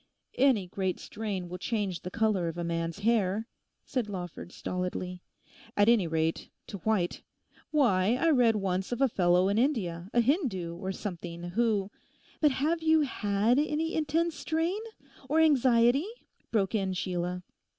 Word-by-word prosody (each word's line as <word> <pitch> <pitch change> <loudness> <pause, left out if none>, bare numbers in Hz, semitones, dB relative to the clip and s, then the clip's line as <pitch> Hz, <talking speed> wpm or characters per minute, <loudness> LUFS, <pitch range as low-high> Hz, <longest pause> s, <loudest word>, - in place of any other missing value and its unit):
'Any 255 -8 +3
great 185 0 -2
strain 205 -4 -4
will 180 +1 -7
change 200 -4 -2
the 180 - -5
colour 215 -4 +1
of 165 +1 -4
a 175 - -2
man's 165 +2 -3
hair,' 215 -1 +1 0.4
said 245 -5 -2
Lawford 180 -2 -6
stolidly; 180 0 -4 0.6
'at 205 0 +5
any 230 -7 +4
rate, 160 0 -1 0.2
to 200 - -7
white. 190 -2 0 0.5
Why, 235 -8 +3
I 330 +5 +2
read 245 -6 +4
once 190 -1 -1
of 245 - -2
a 270 - +5
fellow 180 -4 +3
in 200 +2 +2
India, 190 - -1
a 240 - +2
Hindoo, 230 - 0
or 190 +2 -4
something, 175 -3 -6
who—' 210 -2 +1 0.5
'But 300 - +5
have 315 +5 0
you 320 0 +4
had 220 -2 +1
any 310 +2 0
intense 320 +2 0
strain, 330 +7 -1 0.5
or 315 - +3
anxiety?' 265 - +4 0.4
broke 200 -3 0
in 195 -3 0
Sheila. 180 0 -3
205 Hz, 150 wpm, -29 LUFS, 180-260 Hz, 0.6 s, at